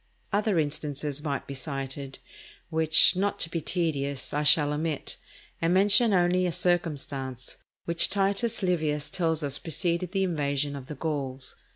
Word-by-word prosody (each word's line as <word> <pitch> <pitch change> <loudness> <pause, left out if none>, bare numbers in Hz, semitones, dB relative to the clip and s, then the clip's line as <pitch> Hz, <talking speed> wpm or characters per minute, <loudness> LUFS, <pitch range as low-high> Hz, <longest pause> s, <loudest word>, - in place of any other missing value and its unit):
Other 205 -2 +1
instances 145 -1 -2
might 140 -3 -3
be 140 - -7
cited, 135 0 -5 0.5
which, 160 +1 +5
not 200 +2 0
to 165 - +1
be 165 - -2
tedious, 140 -5 -2
I 145 - 0
shall 150 0 +5
omit, 155 -1 -3 0.4
and 165 +2 +2
mention 205 +4 +5
only 180 -1 +3
a - - -1
circumstance 140 -8 -1 0.3
which 170 0 +3
Titus 200 +3 0
Livius 150 -5 0
tells 160 -3 0
us 140 -1 -1
preceded 170 +2 -1
the 195 -1 0
invasion 145 -5 -1
of 135 -2 -8
the 150 - -6
Gauls. 135 -3 -3
155 Hz, 150 wpm, -27 LUFS, 140-175 Hz, 0.5 s, which